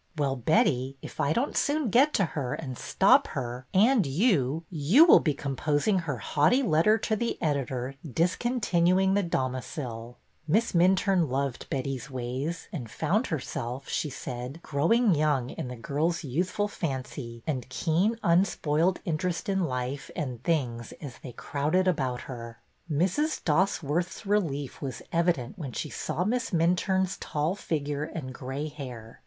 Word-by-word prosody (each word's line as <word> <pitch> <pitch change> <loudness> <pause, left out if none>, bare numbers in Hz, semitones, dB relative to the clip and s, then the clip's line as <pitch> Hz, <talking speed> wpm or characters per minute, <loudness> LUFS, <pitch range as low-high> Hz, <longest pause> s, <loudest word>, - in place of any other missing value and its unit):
'^Well, 135 -4 -1
Betty, 135 -2 +2
if - - -9
I 150 -1 +2
don't 240 - 0
soon 290 -6 +1
get 275 +7 +5
to 195 - +3
her 135 -5 -2
and 130 -5 -6
stop - - +4
her 125 0 -4
— - - -39
and 225 +4 +5
you 155 - +2
— - - -39 0.2
you 295 +9 +9
will 340 - +8
be 150 -3 0
composing 145 +7 0
her 150 -7 -3
haughty 150 - +2
letter 205 +2 +4
to 220 0 -1
the 235 +2 -2
editor 135 -4 -1
discontinuing 185 - +2
The 205 - +3
Domiciled 130 - -3 0.3
Miss 215 +9 +2
Minturne 185 -1 +3
loved 135 -1 -2
Betty's 135 0 -3
ways 130 +6 -4
and 125 -10 -5
found 210 - 0
herself, 135 -4 -4
she 150 - -1
said, 125 +3 -6
growing 195 +10 +3
young 145 -5 +1
in - - -5
the 125 - -6
girl's 150 +9 -1
youthful 180 +9 -1
fancy 130 - -5
and 130 -5 -3
keen, 175 - +1
unspoiled 170 -1 +2
interest 170 +6 -2
in 190 -2 +1
life 130 0 -3
and 130 -8 -4
things 120 -8 -1
as 140 -6 -9
they 130 - -8
crowded 155 +10 0
about 130 -8 0
her. 115 -3 -8 0.3
^ 145 - 0
Mrs. 200 - +1
Dosworth's 170 +2 0
relief 160 -10 -1
was 130 -4 -5
evident 170 - 0
when 135 -6 -5
she 150 - -4
saw 155 +3 -2
Miss 245 +5 0
Minturne's 180 +2 +1
tall 150 +3 -1
figure 150 -6 -2
and 150 -5 -6
gray 135 +4 -4
hair. 125 -7 -9
150 Hz, 155 wpm, -28 LUFS, 130-185 Hz, 0.3 s, you